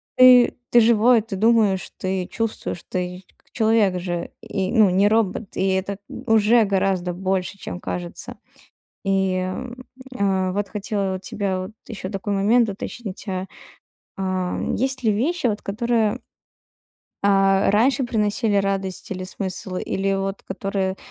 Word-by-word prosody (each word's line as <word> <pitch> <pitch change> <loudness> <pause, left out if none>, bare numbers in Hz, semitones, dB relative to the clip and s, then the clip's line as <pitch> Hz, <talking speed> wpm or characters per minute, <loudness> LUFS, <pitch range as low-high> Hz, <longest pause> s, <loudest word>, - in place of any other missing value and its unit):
Ты 255 -1 +7 0.2
ты 240 - +7
живой, 230 +1 +5
ты 225 -3 -6
думаешь, 215 -2 +2
ты 185 -1 -2
чувствуешь, 225 -6 -3
ты 180 0 -4
как - - -33
человек 220 -5 +2
же 175 -1 -4
и, 190 -1 -3
ну, 215 -5 +5
не 195 +3 +4
робот, 215 -1 0
и 190 - +1
это 190 +1 -1 0.3
уже 225 +1 +5
гораздо 190 -2 0
больше, 190 +1 -2
чем 180 - -6
кажется. 175 -1 -6 0.7
И, 190 -1 +1
м, 240 +8 -4 0.3
а, 190 -2 +1
вот 205 0 -1
хотела 200 -2 -2
у - - -5
тебя 190 0 -2
вот 185 - -7 0.2
ещё 195 -5 -6
такой 200 0 -3
момент 220 +4 +3
уточнить: 205 +1 -6
а, 185 -1 -2 0.7
а 185 -1 -2 0.2
есть 265 0 -1
ли 220 - +3
вещи 275 +8 0
вот, 210 -2 -1
которые, 230 +2 0 1.0
а, 195 -1 +3
раньше 255 +6 +3
приносили 210 -1 0
радость 195 -1 -1
или 185 -1 -4
смысл, 185 0 -4
или 195 +1 -1
вот 195 0 -3
которые 190 -1 -2
195 Hz, 140 wpm, -22 LUFS, 190-220 Hz, 1.0 s, Ты